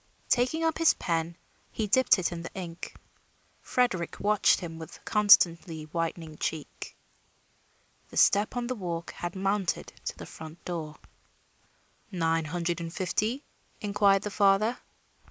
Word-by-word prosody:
Taking 255 +7 +2
up 325 0 +1
his 330 - +5
pen, 165 0 -2 0.3
he 220 - -2
dipped 260 +4 +4
it 180 -2 -1
in 170 -1 -5
the 165 - -7
ink. 175 -2 -7 0.7
Frederick 235 -9 0
watched 210 0 +3
him 165 -3 -7
with 160 - -11
constantly 175 -5 +4
whitening 165 0 -4
cheek. 155 -3 -5 1.1
The - - -9
step 205 +5 +4
on 245 - -1
the 255 - -2
walk 170 -6 -4
had 175 +1 -6
mounted 195 -1 -1
to - - -4
the - - -8
front 160 +1 -11
door. 160 -4 -5 1.1
"Nine 165 -3 0
hundred 170 +1 -2
and 165 0 -5
fifty?" 215 - -1 0.4
inquired 200 -2 +3
the 210 - -4
father. 205 +4 +3
180 Hz, 135 wpm, -28 LUFS, 165-210 Hz, 1.1 s, his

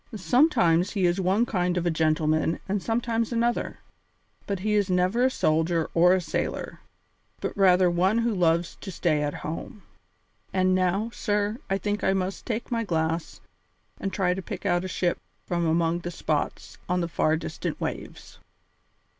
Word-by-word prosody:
Sometimes 200 - +3
he 195 -4 +1
is 175 +2 +2
one 195 +6 +2
kind 180 -5 0
of 175 - -1
a 175 - +2
gentleman 155 0 +1
and 200 0 -1
sometimes 230 +1 -1
another, 235 0 0 0.7
but 195 -2 -2
he 210 +1 0
is 205 -2 +2
never 185 +6 +2
a - - +4
soldier 160 -6 +1
or 175 +2 +5
a - - +1
sailor, 175 - -3 0.6
but - - -4
rather 185 -2 +5
one 180 +5 +2
who 235 -1 +1
loves 170 -2 +1
to 195 - -6
stay 160 -3 +1
at 145 -1 -2
home. 180 +6 -6 0.7
And 185 0 +2
now, 185 +5 +1
sir, 210 +1 -1
I 195 - +1
think 205 +2 -2
I 190 - +3
must 190 0 -3
take 230 +1 -3
my 230 -1 0
glass 165 -3 -2 0.6
and 195 - -3
try 185 -2 +1
to 190 - -4
pick - - -7
out 175 0 +2
a - - -3
ship 180 -1 -1 0.3
from 170 -2 0
among 165 +1 +1
the 175 - -5
spots 155 -3 -3
on 180 0 +1
the 170 - -1
far 160 -1 +1
distant 155 -1 -5
waves." - - -6
185 Hz, 170 wpm, -26 LUFS, 170-205 Hz, 0.7 s, or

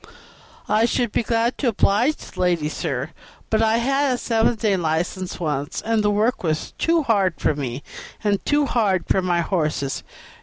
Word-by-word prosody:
"I 215 +2 +3
should 240 -1 0
be - - +1
glad 230 +1 0
to 270 - 0
oblige 230 +5 +2
the - - -12
lady, 175 -4 +1
sir, 145 -2 -3 0.4
but 220 0 +3
I 225 0 +3
had 275 +3 +1
a - - -4
seven 230 0 +1
days' 205 -3 +1
license 175 +3 -2
once, 150 -2 -2
and 225 -1 +1
the 210 - +3
work 215 +4 +1
was 155 -3 -2
too 330 -1 +2
hard 200 -8 +2
for - - +2
me, 135 -2 -4 0.4
and 205 -2 +1
too 290 0 +2
hard 200 -9 +1
for 190 - +2
my 175 -2 +1
horses. 155 -6 -1
205 Hz, 180 wpm, -22 LUFS, 165-230 Hz, 0.4 s, I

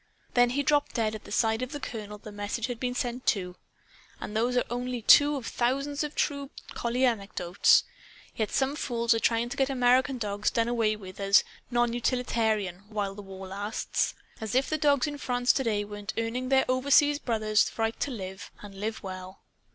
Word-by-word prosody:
Then 245 -1 +5
he 280 +4 0
dropped 290 0 +1
dead 220 -3 +1
at 215 - -8
the - - -11
side 220 +1 +1
of 255 +3 -4
the 290 - -4
Colonel 210 -5 -6
the 215 +1 -11
message 205 +2 -3
had 245 -2 -5
been 250 0 -2
sent 250 0 -3
to. 180 -4 0 0.6
And 210 - -6
those 240 +3 +1
are 245 - +3
only 245 -1 -3
two 290 +5 +7
of 265 -4 -5
thousands 275 +6 -1
of 300 0 -5
true 280 -1 -1 0.2
collie 245 +2 0
anecdotes. 200 -6 +3 0.5
Yet 220 -2 -1
some 270 +1 0
fools 235 -4 +1
are 225 - 0
trying 230 +1 +1
to - - -6
get 270 0 +2
American 255 +1 +3
dogs 205 -2 -1
done 230 0 0
away 225 -3 +1
with, 190 -2 -11
as 200 +1 +5 0.3
'non 240 -1 +1
utilitarian,' 220 -6 0
while 205 -2 -2
the 205 - -9
war 190 -1 -9
lasts! 205 +3 -2 0.3
As 220 +1 -3
if 260 +1 +3
the 310 - +1
dogs 285 -2 +3
in 290 -1 -5
France, 245 -1 +2
today, 220 -6 0
weren't 205 -1 -7
earning 235 +3 -2
their 265 0 +4
overseas 285 +3 +4
brothers' 215 -4 +1
right 225 0 -1
to - - -1
live 190 -5 -7
and 205 -1 -9
live 220 +2 -4
well!" 185 0 -8
235 Hz, 195 wpm, -28 LUFS, 210-255 Hz, 0.6 s, two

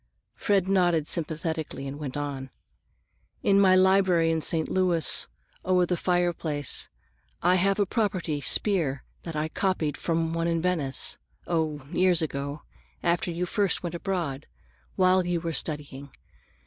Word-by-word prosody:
Fred 195 -3 +1
nodded 175 -5 +2
sympathetically 160 -3 -2
and 140 +2 -7
went 145 -2 -5
on. 140 -2 -4 0.9
"In 200 0 +4
my 190 -2 +6
library 185 -3 +4
in 160 -1 0
St. 160 0 0
Louis, 175 -5 +2 0.4
over 180 -1 +3
the 180 - 0
fireplace, 170 -5 -1 0.5
I 180 +1 +4
have 195 +2 +2
a 205 - +3
property 185 -8 -1
spear 155 -8 +1 0.2
I - - -3
had 155 - -6
copied 185 -6 0
from 165 -1 -1
one 165 0 -1
in 165 -1 +1
Venice,—oh, 155 -1 -1
years 180 -3 +3
ago, 140 0 -4 0.4
after 175 +1 +1
you 175 +1 -2
first 200 -1 0
went 175 -1 -4
abroad, 170 -6 -3 0.5
while 185 0 +4
you 175 -1 -1
were 165 0 -4
studying. 145 -2 -4
170 Hz, 135 wpm, -26 LUFS, 150-185 Hz, 0.9 s, my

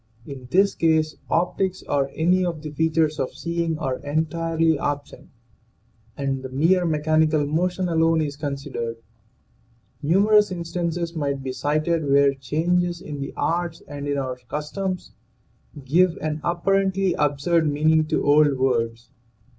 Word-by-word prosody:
In 130 -3 -9
this 195 +6 +3
case 160 -1 +1
optics 185 +2 0
or 140 -1 +1
any 180 +3 +2
of 170 -4 -3
the 155 - -5
features 160 0 +1
of 130 - -3
seeing 170 -1 -2
are 135 -5 -2
entirely 160 +1 0
absent 145 0 -4 0.9
and 135 -1 -2
the 130 - -7
mere 165 +7 +2
mechanical 155 -1 +2
motion 180 +5 0
alone 165 -1 +2
is 145 -2 -3
considered. 140 -5 -4 1.0
Numerous 205 +6 +4
instances 170 -1 -3
might 140 -3 -2
be 130 - -3
cited 155 +4 0
where 140 0 +5
changes 175 +6 0
in 150 -3 -7
the 140 - -4
arts 170 0 -1
and 145 -1 -6
in 145 0 -1
our 130 -2 -3
customs 180 +5 -4 0.7
give 170 +5 +3
an 155 0 -3
apparently 190 +1 +1
absurd 150 +2 +1
meaning 155 +2 +3
to 155 - 0
old 145 -1 +4
words. 115 -3 -1
155 Hz, 135 wpm, -23 LUFS, 145-170 Hz, 1.0 s, where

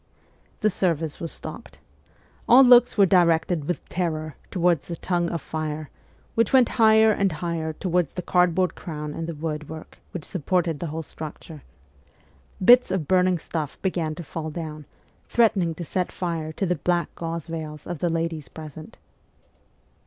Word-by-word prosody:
The 215 - +3
service 165 -5 -1
was 165 - -4
stopped. - - -9 0.7
All 255 +3 +9
looks 245 -2 +6
were 200 - +7
directed 170 -3 +3
with 175 - -3
terror 155 -4 -3
towards 175 -5 +1
the 170 - -4
tongue 175 0 -1
of 165 -3 -4
fire, 155 -1 -4 0.4
which 230 -2 +2
went 255 -3 +5
higher 220 0 +6
and 200 -2 +1
higher 160 0 -3
towards 175 -2 -1
the 180 - -4
cardboard 180 0 +2
crown 150 -3 -6
and 165 +1 -4
the 170 - -5
wood 155 -1 -4
work 160 0 -10
which 175 - -7
supported 175 -2 -1
the 170 - -3
whole 160 +1 -4
structure. 155 0 -9 1.0
Bits 245 +3 +7
of 175 -6 -2
burning 185 0 +3
stuff 155 -2 -5
began 170 -5 -1
to 175 - -7
fall 160 0 -5
down, 155 -2 -6 0.4
threatening 195 -8 +2
to 170 - -6
set 180 +4 -2
fire 165 -3 -3
to 195 - -2
the 180 -2 0
black 175 +3 0
gauze 165 -1 -4
veils 155 -2 -6
of 175 -3 -5
the 175 - 0
ladies 165 -2 -2
present. 155 +6 -10
170 Hz, 160 wpm, -24 LUFS, 155-180 Hz, 1.0 s, All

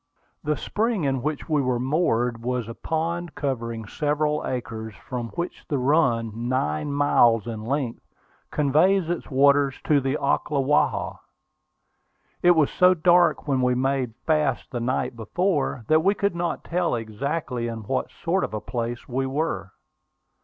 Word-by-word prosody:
The 150 -1 0
spring 220 -4 -1
in 135 -2 0
which 150 +1 -3
we 150 -3 +2
were 125 -2 0
moored 125 -4 +1
was 125 -1 -2
a 115 - -6
pond 165 +5 -3
covering 115 -5 -3
several 150 +5 0
acres, 110 -3 -5
from 125 -2 -5
which 175 +1 -4
the 145 - 0
run, 125 -5 +2 0.2
nine 75 - -1
miles 120 -6 +4
in 115 -2 -5
length, 130 0 -2 0.5
conveys 165 +5 +2
its 175 - -4
waters 140 0 +4
to 145 -2 +3
the 135 +2 0
Ocklawaha. 140 0 +1 1.2
It 175 0 +6
was 155 -3 +3
so 185 0 +5
dark 175 -1 +3
when 135 -2 +1
we 125 0 +2
made 130 -2 0
fast 155 -3 +1
the 120 - -3
night 120 +1 -1
before, 135 - -1
that 155 0 +4
we 200 +2 +3
could 200 -2 0
not 170 0 -2
tell 175 -5 0
exactly 120 +3 -3
in 115 -1 -5
what 130 +5 -2
sort 180 +3 -1
of - - -3
a - - -2
place 120 +1 -4
we 135 +1 -1
were. 130 - -2
140 Hz, 155 wpm, -24 LUFS, 120-160 Hz, 1.2 s, It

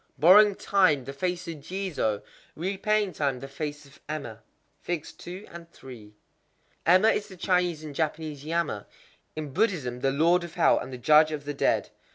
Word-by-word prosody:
_ - - -27
Borrowing 200 +5 +7
time, 170 -12 +2
the 135 - -6
face 180 +4 -3
of 165 -2 -5
Jizō; 155 - -3 0.3
repaying 195 +3 0
time, 140 -4 -1
the 135 - -8
face 145 +1 -6
of 140 0 -19
Emma. 125 -8 -5 0.5
Emma 170 -4 -1 2.1
is 205 - 0
the 190 -3 -12
Chinese 180 -3 0
and 150 -2 -7
Japanese 155 -1 -3
Yama,—in 155 -1 -5
Buddhism 160 - 0
the 135 - +1
Lord 165 +6 +3
of 170 - -9
Hell, - - +4
and 130 - -7
the 125 - -6
Judge 155 +4 +5
of 145 -2 -5
the 145 - -3
Dead. - - 0
155 Hz, 155 wpm, -27 LUFS, 140-180 Hz, 2.1 s, Borrowing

